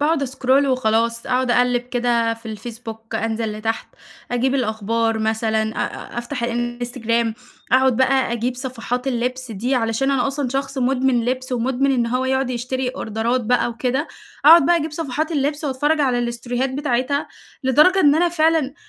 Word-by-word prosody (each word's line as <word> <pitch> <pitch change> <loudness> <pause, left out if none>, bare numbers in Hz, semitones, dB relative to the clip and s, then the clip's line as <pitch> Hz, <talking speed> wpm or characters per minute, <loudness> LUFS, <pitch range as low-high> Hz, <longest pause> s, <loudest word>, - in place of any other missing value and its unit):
باقعد 300 0 +2
أسكرول 270 +1 +2
وخلاص 230 -2 +1
أقعد 255 0 +1
أقلِّب 245 0 +3
كده 240 -2 0
في 230 0 -14
الفيسبوك، 225 0 -8
أنزل 225 -1 -1
لتحت 225 +1 -3 0.4
أجيب 255 +2 +1
الأخبار 225 -1 0
مثلًا، 220 0 0
أ 240 - -4
أفتح 240 +1 -5
الإنستجرام، 240 -1 -1 0.4
أقعد 260 -2 +4
بقى 260 -2 +2
أجيب 240 +2 -1
صفحات 250 0 -4
اللِبس 250 0 -2
دي 240 +7 -1
علشان 230 +3 0
أنا 270 -2 +1
أصلًا 275 -1 -2
شخص 270 +1 -3
مدمن 255 -2 +1
لِبس، 255 +1 -2
ومدمن 260 +3 +1
إن 240 -2 +1
هو 255 +2 -1
يقعد 265 0 0
يشتري 255 +1 -2
أوردرات 235 0 -1
بقى 245 +2 +1
وكده، 255 +5 -2 0.4
أقعد 320 -1 +8
بقى 345 - +4
أجيب 315 -1 -2
صفحات 310 +1 -3
اللِبس 290 +1 -1
وأتفرّج 295 +3 +1
على 255 -4 +2
الستوريهات 240 +2 -2
بتاعتها، 275 0 -1 0.4
لدرجة 305 +9 +5
إن 290 -4 +5
أنا 345 +2 +3
فعلًا 315 -4 +1
250 Hz, 155 wpm, -21 LUFS, 235-270 Hz, 0.4 s, أقعد